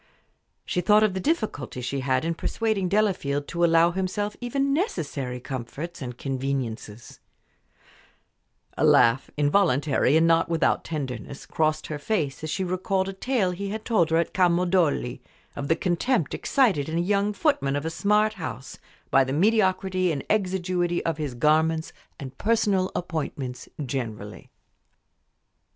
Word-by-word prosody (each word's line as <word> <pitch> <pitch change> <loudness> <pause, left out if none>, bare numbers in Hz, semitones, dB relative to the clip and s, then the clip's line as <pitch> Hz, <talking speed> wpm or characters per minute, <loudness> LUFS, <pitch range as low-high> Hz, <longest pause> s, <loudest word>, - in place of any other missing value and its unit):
She 180 - -1
thought 210 +4 +5
of 215 -3 +2
the 190 - -2
difficulty 215 - -2
she 125 +3 -3
had 130 +1 0
in 165 - 0
persuading 205 +1 -1
Delafield 175 -9 0
to 170 0 -1
allow 165 0 +5
himself 190 +3 -2
even 275 +3 0
necessary 145 - -2
comforts 135 +7 -6
and 125 -2 -6
conveniences; 130 -5 -4 1.6
a - - -1
laugh, 115 +3 +4
involuntary, 145 -3 +3
and 165 - +4
not 165 0 +3
without 165 -1 +1
tenderness, 135 -4 -5
crossed 155 -1 0
her 150 -1 -5
face 155 -6 -2
as 155 - -3
she 190 - -1
recalled 190 +1 -1
a - - -5
tale 205 -2 0
he 195 +3 -4
had 215 +1 -5
told 190 -9 +2
her 165 - +2
at 170 - 0
Camaldoli, 175 -8 +2 0.3
of 140 0 -4
the 160 - +3
contempt 175 - 0
excited 200 - +1
in 160 - -2
a - - +2
young 200 +3 +1
footman 200 - +1
of 145 +2 -3
a 160 - -2
smart 210 +4 +2
house 160 - -7 0.3
by 135 - +5
the 130 - -4
mediocrity 185 -1 +2
and 140 -3 -3
exiguity 185 -3 0
of 165 -1 -1
his 145 -5 -3
garments 160 +4 +2 0.3
and 135 -3 -9
personal 205 -4 +1
appointments 145 -6 -4 0.2
generally. 110 -5 -5
165 Hz, 145 wpm, -25 LUFS, 140-195 Hz, 1.6 s, thought